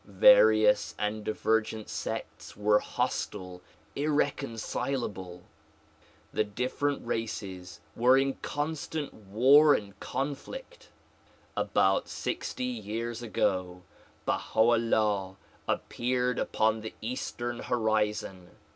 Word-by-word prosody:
Various - - +5
and 105 0 -2
divergent 110 0 0
sects - - -6
were 105 0 +4
hostile, 90 -3 -3 0.3
irreconcilable. 120 -9 -2 0.9
The - - +2
different 125 +7 -2
races 100 -6 -4
were 125 +3 +5
in 135 0 +2
constant 150 0 -3
war 130 +9 +5
and 100 -1 -6
conflict. 470 - -5 0.7
About - - +2
sixty 255 - -4
years 120 - -4
ago 90 -5 -1 0.4
BaHxV - - -2
'Ullah 110 -4 +2 0.3
appeared 125 0 -1
upon 110 0 +1
the 110 - -7
eastern 120 0 -4
horizon. 105 -5 -1
115 Hz, 85 wpm, -29 LUFS, 105-135 Hz, 0.9 s, Various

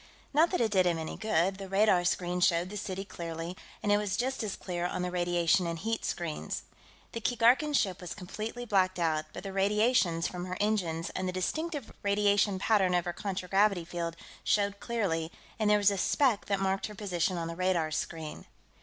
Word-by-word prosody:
Not 320 +4 +5
that 360 - 0
it 225 -2 +2
did 185 -3 +4
him 170 -1 +1
any 160 -1 -4
good; 195 -3 +1
the 195 -1 -7
radar 195 -2 +4
screen 180 0 0
showed 175 +1 +2
the - - -6
city 195 -1 -4
clearly, 170 -1 -6 0.3
and 205 - +2
it 205 - +5
was 205 -1 -1
just 260 +3 -1
as 210 -3 -2
clear 175 -1 -3
on 180 - -3
the 180 - -2
radiation 175 0 +2
and 165 0 -2
heat 225 +6 -2
screens. 170 -3 -3 0.5
The 230 - -5
Keegarkan 245 +6 +3
ship 190 -9 +1
was 180 - -6
completely 215 +5 -6
blacked 190 -4 +2
out, 160 -3 +1
but 175 - -8
the 195 -1 -6
radiations 200 -3 +2
from 180 0 -5
her 185 0 -4
engines 180 -6 0
and 185 0 -3
the - - 0
distinctive 295 - -3
radiation 205 0 +2
pattern 190 -2 +3
of 175 - +1
her 175 - -2
contragravity 195 -1 +1
field 170 -1 -4 0.3
showed 200 -1 +1
clearly, 180 -9 -1 0.3
and 215 -1 +2
there 210 - +6
was 205 0 +4
a 200 - -2
speck 245 0 +2
that 200 -1 0
marked 195 0 0
her 210 - -10
position 185 -3 -1
on 165 -1 -2
the 165 - -5
radar 180 -3 +1
screen. 160 0 -4
190 Hz, 200 wpm, -30 LUFS, 175-210 Hz, 0.5 s, there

